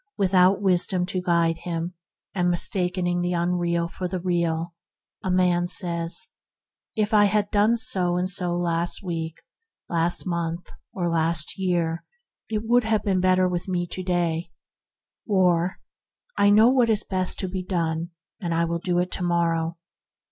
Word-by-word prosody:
Without 190 0 +3
wisdom 180 -1 +1
to 185 0 -3
guide 170 -2 +1
him, 170 +1 -4 0.4
mistaking 180 0 0
the 175 0 -1
unreal 170 -1 0
for 180 +1 -5
the 185 0 -4
real, 170 -1 -1 0.5
a 190 - -2
man 180 -1 +2
says, 170 - +2 0.7
"If 215 0 0
I 205 -1 +6
had 205 0 0
done 215 +3 +3
so 185 -8 +2
and 180 +1 0
so 180 -2 0
last 170 +1 0
week, 165 -3 -4 0.5
last 170 0 +1
month, 170 -1 -3 0.2
or 175 -2 -2
last 165 0 -1
year, 170 -3 -1 0.5
it 215 -1 -2
would 240 +2 +3
have 220 -2 +1
been 190 -2 +1
better 185 0 +3
with 175 0 -3
me 180 -2 -1
to 185 - -3
day"; 175 -2 -1 0.8
or, 180 -3 +2 0.6
"I 200 - +4
know 215 +3 +6
what 250 -3 +3
is 210 -2 +1
best 185 -1 -1
to 190 - -2
be 185 0 -4
done, 170 -2 -2 0.3
and 170 -5 -2
I 170 +1 +2
will 170 0 -2
do 175 0 -1
it 180 +1 0
to 185 - -2
morrow." 170 -1 0
180 Hz, 155 wpm, -24 LUFS, 170-190 Hz, 0.8 s, I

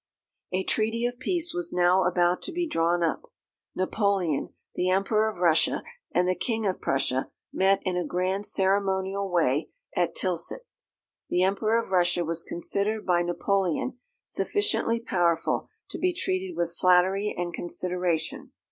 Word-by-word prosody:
A 185 +1 0
treaty 225 +3 0
of 245 0 -3
peace 345 +4 0
was 350 -1 -1
now 180 +1 +3
about 175 0 +2
to 360 - -5
be 350 0 -1
drawn 170 - +1
up. 475 - -2 0.4
Napoleon, 185 -5 0 0.2
the 180 - 0
Emperor 210 +3 +2
of 215 - -8
Russia, 165 -3 +3 0.3
and 180 +1 +2
the 185 - +3
King 220 +4 -2
of 190 -2 -1
Prussia, 135 -1 0 0.2
met 195 +1 +3
in 185 -1 0
a 180 - 0
grand 185 +4 -1
ceremonial 195 0 0
way 155 -4 +1 0.3
at 170 -2 0
Tilsit. 185 - -1 0.6
The 180 - +2
Emperor 215 +4 +2
of 230 -4 -3
Russia 175 -1 +2
was 165 +1 -2
considered 200 +5 -2
by 175 -2 +3
Napoleon 195 - -1 0.2
sufficiently 410 - 0
powerful 175 -7 0 0.2
to - - -4
be 365 0 +1
treated 370 0 -2
with 170 0 -1
flattery 185 +3 +3
and 175 -1 -3
consideration. 180 -1 -1
185 Hz, 145 wpm, -27 LUFS, 175-215 Hz, 0.6 s, now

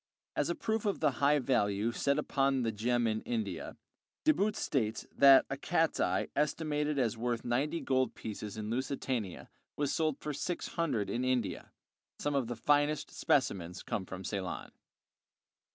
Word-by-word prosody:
As 145 - +1
a 170 - 0
proof 220 -1 -1
of 200 - 0
the 150 -2 +3
high 145 +1 +5
value 110 -5 +1
set 140 +3 +1
upon 135 -3 +1
the 115 - 0
gem 120 +3 +1
in 110 -1 0
India, 235 -2 -3 0.5
De 310 - +6
Boot 210 -4 +1
states 115 - -1
that 135 -1 +8
a - - -3
cat's - - +1
eye - - +1
estimated 150 0 0
as 120 -4 +1
worth 120 -1 -1
ninety 135 +7 0
gold 130 -3 +1
pieces 105 -1 -6
in 110 0 -4
Lusitania 125 -5 -2 0.3
was 145 -1 0
sold 155 -3 +1
for 150 - -4
six 175 +5 -3
hundred 145 - -1
in 120 +4 -1
India. 130 -4 -1 0.5
Some 145 - -1
of 135 -4 +1
the 120 - -3
finest 145 +4 +2
specimens 90 -10 0
come 95 -3 -3
from 95 0 -7
Ceylon. 95 -2 -4
130 Hz, 165 wpm, -32 LUFS, 115-150 Hz, 0.5 s, that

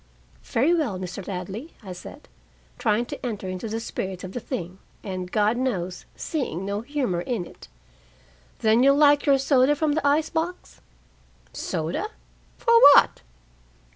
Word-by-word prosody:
"Very 275 +9 +2
well, 290 - 0
Mr. 185 +1 -7
Ladley," 195 - -6
I 190 -2 -7
said, 180 - -11 0.5
trying 215 +3 +1
to - - -8
enter 215 -6 -4
into 185 +4 -5
the 225 +1 -2
spirit 190 -4 -5
of 185 - -6
the 245 - -4
thing, 190 -7 -6 0.2
and, 185 -2 -5
God 215 +2 +2
knows, 185 -9 -2
seeing 250 - -3
no 200 +1 -2
humor 245 -9 -2
in 210 -2 -3
it. - - -14 0.9
"Then 220 +2 +4
you'll 275 +1 +5
like 290 -1 +5
your 275 -1 +6
soda 270 +1 +3
from 305 +1 0
the 290 -1 0
ice 300 +2 +2
box?" 335 +2 -4 0.7
"Soda? 165 - -3 0.5
For 465 - +2 0.2
what?" - - +4
225 Hz, 150 wpm, -24 LUFS, 185-285 Hz, 0.9 s, your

